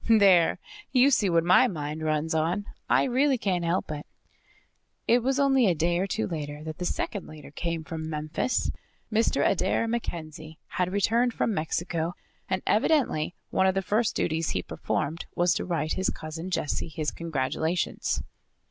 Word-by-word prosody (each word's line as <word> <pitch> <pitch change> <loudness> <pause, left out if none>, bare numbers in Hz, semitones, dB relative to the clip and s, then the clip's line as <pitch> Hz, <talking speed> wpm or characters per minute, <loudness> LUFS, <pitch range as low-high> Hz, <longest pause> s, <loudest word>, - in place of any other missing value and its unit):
"There! 195 -6 +6 0.3
You 260 +2 +5
see 210 -6 +3
what 165 -1 +3
my 185 +9 +6
mind 155 -5 -4
runs 155 +1 0
on. 170 +6 0 0.2
I - - +4
really 265 +1 +2
can't 185 -6 0
help 170 -1 0
it." 150 -1 -6 1.0
It 240 +1 +5
was 265 +3 +1
only 270 -4 +4
a 180 - +3
day 170 +2 +1
or 190 - 0
two 220 +3 -1
later 150 -3 -5
that 155 +1 -7
the 180 - -2
second 200 +2 -2
letter 155 -2 -11
came 165 +1 -3
from 160 +1 -5
Memphis. 155 +10 -1 0.4
Mr. 225 +1 +3
Adair 230 - +1
MacKenzie 160 -8 -5
had 180 0 -1
returned 230 +5 +2
from 225 - +1
Mexico 165 +1 -2 0.3
and 190 0 -1
evidently 215 - +2 0.2
one 190 - +3
of 190 - +2
the 195 - 0
first 215 +4 +1
duties 160 -1 0
he - - -1
performed 155 +3 -3
was 175 0 +3
to - - -2
write 165 -3 -1
his 190 - 0
Cousin 160 +3 -5
Jessie 165 -2 -1
his 155 -1 -2
congratulations. 160 +2 -1
175 Hz, 165 wpm, -27 LUFS, 155-210 Hz, 1.0 s, There